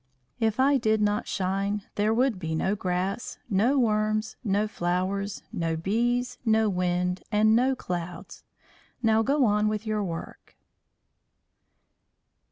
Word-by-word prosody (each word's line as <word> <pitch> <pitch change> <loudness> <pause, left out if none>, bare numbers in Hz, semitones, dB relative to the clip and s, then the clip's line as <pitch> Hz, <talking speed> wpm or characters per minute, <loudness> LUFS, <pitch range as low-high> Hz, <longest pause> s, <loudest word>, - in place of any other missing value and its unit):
If 225 +1 0
I 275 +2 +5
did 220 -3 +1
not 210 0 0
shine 195 +1 -1
there 210 +1 +1
would 240 -2 +1
be 160 -2 -3
no 190 +5 0
grass, 190 +2 -2
no 225 +9 +3
worms, 215 -2 +1
no 205 -1 +1
flowers, 190 +1 -2
no 165 -1 -1
bees, 240 +7 0
no 220 -2 +3
wind, 180 -1 0
and 215 +1 +4
no 260 +3 +3
clouds. 175 -5 -6 0.6
Now 220 0 +4
go 275 +3 +2
on 210 0 +2
with 215 +1 -2
your 215 -1 -1
work." 165 -3 -7
210 Hz, 130 wpm, -27 LUFS, 185-225 Hz, 0.6 s, I